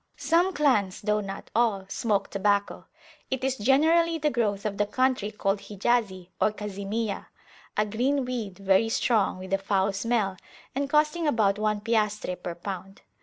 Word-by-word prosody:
Some 345 +3 +2
clans, 230 - +2
though 210 0 +1
not 195 -1 -7
all, 220 -5 +2
smoke 205 0 -1
tobacco. 200 0 0 0.4
It 265 -1 -2
is 265 0 +1
generally 320 +8 +3
the 300 -1 0
growth 210 -4 -1
of 205 -1 -3
the 205 - +2
country 255 -2 +1
called 200 -1 -1
Hijazi 200 -3 -1
or - - +4
Kazimiyah; 210 +1 -4 0.5
a 210 - +3
green 255 +6 0
weed, 230 -7 -4
very 195 +3 +3
strong, 225 -4 +1
with 185 +1 -6
a 195 - +3
foul 195 0 +1
smell, 200 -2 0 0.4
and 275 +1 -2
costing 305 +2 +2
about 210 -7 +2
one 210 -1 0
piastre 210 -4 0
per 175 -1 -6
pound. 195 +2 -7
210 Hz, 160 wpm, -27 LUFS, 195-250 Hz, 0.5 s, or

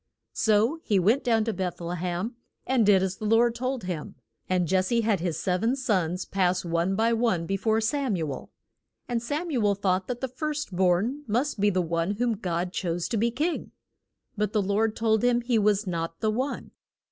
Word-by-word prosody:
So 220 +8 +2
he 205 - +1
went 215 +9 +3
down 225 -2 +2
to 225 0 -1
Beth 185 -3 -3
le 175 +1 -4
hem, 180 +7 -3 0.3
and 255 -3 +2
did 195 -2 +5
as 190 0 -2
the 215 - -6
Lord 230 +2 +4
told 255 +1 -3
him. 175 -4 -5 0.3
And 180 -1 +2
Jes 185 0 +2
se 235 +2 +2
had 215 -4 +1
his 170 -2 -2
sev 180 -1 0
en 235 +4 +2
sons 185 - 0
pass 185 -2 0
one 170 +3 0
by 230 +3 +2
one 225 -8 +1
be 195 - -1
fore 220 +3 +1
Sam 255 0 0
u 160 -4 -2
el. - - -9 0.6
And 240 -2 -1
Sam 300 +8 -3
u 245 -6 0
el 205 -1 +3
thought 190 -1 0
that 245 -1 -3
the 265 - -2
first 295 - -4
born 190 +10 +2
must 245 +3 0
be 205 +1 +4
the 185 -2 +1
one 170 +3 -1
whom 240 +2 +1
God 180 -3 -3
chose 170 -1 -2
to 230 - -1
be 230 +3 +2
king. 305 +8 -2 0.6
But 210 0 -1
the 215 - +3
Lord 210 +3 +1
told 220 -1 +1
him 245 -1 +3
he 240 -1 +1
was 210 0 +2
not 165 -2 -3
the 215 - +1
one. 260 +6 -3
210 Hz, 215 wpm, -26 LUFS, 185-235 Hz, 0.6 s, did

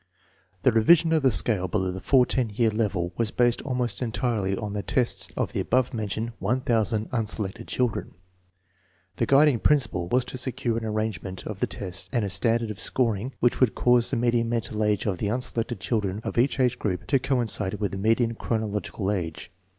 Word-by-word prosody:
The 130 - +5
revision 160 +9 +4
of 160 - +3
the 135 -2 +4
scale 105 -4 +3
below 95 0 -1
the 95 - -6
14 125 0 +2
year 115 -1 +2
level 100 -5 -1
was 115 -2 0
based 120 +1 +1
almost 125 -6 -2
entirely 110 -5 -1
on 105 -2 -4
the 105 - -2
tests 125 +2 -1
of - - -1
the - - -1
above 130 0 +1
mentioned 110 +1 -3
1,000 110 0 0
unselected 110 -1 -1
children. 125 -4 -2 1.0
The - - 0
guiding 140 -2 +5
principle 125 -13 +1
was 125 +6 +1
to 130 - -6
secure 125 -2 -2
an 115 - -6
arrangement 105 -4 -3
of 105 -3 -6
the - - +1
tests 95 -2 -5
'and 120 -5 0
a 100 - -3
standard 115 +3 +1
of 100 - -8
scoring 120 0 0
which 120 - +2
would 130 -4 +3
cause 120 -1 +3
the - - -1
median 115 -1 +1
mental 115 -2 -2
age 105 -1 +1
of 95 -5 -1
the 105 - -1
unselected 115 -3 -1
children 100 +2 -1
of - - -4
each 135 +2 +1
age 125 -1 +2
group 90 -4 -2
to 135 - +2
coincide 115 -7 0
with 105 -1 -2
the 95 - -5
median 115 +3 +2
chronological 105 -3 -2
age. 85 -4 -4
115 Hz, 190 wpm, -25 LUFS, 100-125 Hz, 1.0 s, The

